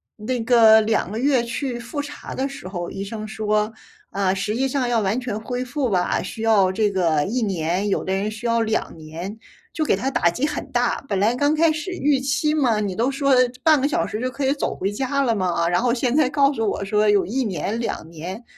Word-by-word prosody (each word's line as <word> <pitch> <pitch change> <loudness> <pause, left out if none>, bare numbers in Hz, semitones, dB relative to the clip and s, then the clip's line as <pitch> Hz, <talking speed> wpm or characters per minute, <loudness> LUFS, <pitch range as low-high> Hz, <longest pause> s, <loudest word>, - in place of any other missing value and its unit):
那 240 +3 -3
个 225 -2 +7
2 215 -3 0
个 220 - -3
月 260 -2 +2
去 245 +1 -3
复 245 +5 -4
查 290 0 -8
的 265 - -1
时 275 -8 -10
候， 175 -2 -4
医 195 - -5
生 215 +1 -6
说： 215 0 -1 0.4
“啊， 195 -1 +1
实 195 +3 -2
际 265 +3 0
上 260 -2 0
要 235 -2 +1
完 205 +4 0
全 240 -4 -4
恢 245 +3 -4
复 260 0 -2
吧， 180 -3 0
需 220 +4 -6
要 200 -4 +4
这 210 +2 +1
个 170 -6 +1
1 245 +6 -1
年， 185 -1 -1
有 195 - -1
的 190 - -1
人 205 +2 -1
需 225 +2 -5
要 230 0 +2
2 220 -5 -2
年。” 165 +7 -7 0.4
就 320 - -1
给 - - +2
他 265 - -2
打 170 - +3
击 250 +11 -1
很 300 - -4
大， - - 0
本 195 - 0
来 215 +4 +3
刚 285 +4 +2
开 325 +1 +4
始 310 +3 -4
预 290 -6 +1
期 290 +3 0
嘛， 250 -8 +2
你 200 -3 -2
都 235 +5 +1
说 275 0 +1 0.3
半 310 -4 +5
个 280 - +2
小 - - 0
时 215 - -4
就 255 - -1
可 275 +2 -3
以 270 - +3
走 290 - -3
回 195 +2 -2
家 265 +6 -1
了 230 -3 +1
嘛。 175 -4 0
然 175 +6 +1
后 245 - +2
现 245 +1 0
在 295 -4 +3
告 280 0 +3
诉 225 -5 0
我 200 - -3
说 210 +1 +2
有 205 -2 +3
1 255 +7 -1
年、 205 +3 -2
2 225 -8 -4
年， 180 +8 -7
225 Hz, 240 characters per minute, -22 LUFS, 200-265 Hz, 0.4 s, 个